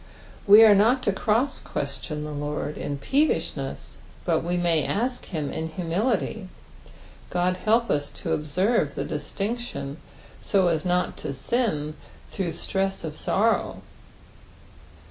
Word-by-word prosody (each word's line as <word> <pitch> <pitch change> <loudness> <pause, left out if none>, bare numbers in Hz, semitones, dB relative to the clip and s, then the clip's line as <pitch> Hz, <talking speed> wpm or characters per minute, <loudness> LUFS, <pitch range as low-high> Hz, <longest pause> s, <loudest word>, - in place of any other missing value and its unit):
We 210 +3 +10
are 215 -2 +9
not 230 +6 +4
to - - +2
croeS'question 210 - -2
the 150 - -5
Lord 145 +1 -3
in 145 -1 -4
peevishness, 280 - -1 0.3
but 165 -2 +1
we 175 +1 -1
may 170 -3 +2
ask 245 +4 -1
of - - -14
him 155 -6 -3
in 160 - -3
humility; 185 +4 -1 0.8
Qod 180 +1 +1
help 225 +4 +2
us 145 -1 0
to 165 - -3
observe 155 +2 +1
tho - - -2
distinction 165 - -4 0.4
so 190 -3 +2
as 160 -2 0
not 180 0 0
to 140 - -5
sin 155 - -1 0.4
through 180 -4 -2
stress 195 +2 -2
of 160 -2 -4
sorrow. 220 +8 0
180 Hz, 130 wpm, -25 LUFS, 150-220 Hz, 0.8 s, We